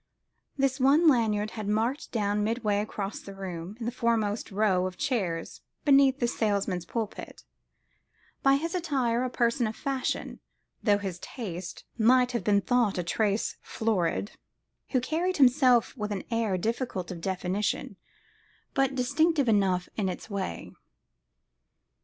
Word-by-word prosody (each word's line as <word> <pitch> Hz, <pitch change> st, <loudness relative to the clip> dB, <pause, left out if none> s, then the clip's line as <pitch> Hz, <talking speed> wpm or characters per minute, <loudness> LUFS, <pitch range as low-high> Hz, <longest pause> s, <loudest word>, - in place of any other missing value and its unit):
This 270 Hz, 0 st, +1 dB
one 285 Hz, +6 st, +5 dB
Lanyard 215 Hz, -6 st, +3 dB
had 215 Hz, -2 st, -5 dB
marked 225 Hz, +7 st, -1 dB
down 210 Hz, -2 st, 0 dB
midway 215 Hz, -2 st, 0 dB
across 205 Hz, -1 st, -4 dB
the 195 Hz, -, -10 dB
room, 185 Hz, 0 st, -6 dB
in 230 Hz, -, -4 dB
the 235 Hz, -, -1 dB
foremost 230 Hz, -3 st, 0 dB
row 190 Hz, -3 st, +2 dB
of 185 Hz, -, -8 dB
chairs 200 Hz, -, -2 dB, 0.2 s
beneath 275 Hz, -2 st, +5 dB
the 240 Hz, -, +2 dB
salesman's 200 Hz, -6 st, -1 dB
pulpit: 225 Hz, -3 st, -5 dB, 1.0 s
by 275 Hz, 0 st, +5 dB
his 330 Hz, +4 st, -2 dB
attire 265 Hz, -9 st, 0 dB
a 255 Hz, -, -1 dB
person 235 Hz, 0 st, +1 dB
of 215 Hz, -, -5 dB
fashion 275 Hz, -3 st, -3 dB, 0.4 s
(though 205 Hz, -2 st, +3 dB
his 190 Hz, -3 st, -5 dB
taste 180 Hz, -6 st, -7 dB, 0.2 s
might 250 Hz, +2 st, +5 dB
have 235 Hz, -, -2 dB
been 200 Hz, -1 st, +3 dB
thought 240 Hz, -4 st, +1 dB
a 180 Hz, -, 0 dB
trace 205 Hz, +4 st, 0 dB
florid) 205 Hz, -3 st, -1 dB, 0.6 s
who 260 Hz, -, +2 dB
carried 335 Hz, +8 st, -1 dB
himself 255 Hz, -3 st, +4 dB
with 210 Hz, -4 st, -4 dB
an 200 Hz, -, -3 dB
air 225 Hz, -5 st, +1 dB
difficult 220 Hz, -3 st, -2 dB
of 170 Hz, -2 st, -7 dB
definition 190 Hz, +2 st, -2 dB, 0.8 s
but 270 Hz, -1 st, +1 dB
distinctive 285 Hz, +3 st, +2 dB
enough 190 Hz, -4 st, +2 dB
in 200 Hz, -3 st, 0 dB
its 185 Hz, -, -7 dB
way. 190 Hz, -, -4 dB
225 Hz, 140 wpm, -28 LUFS, 200-255 Hz, 1.0 s, one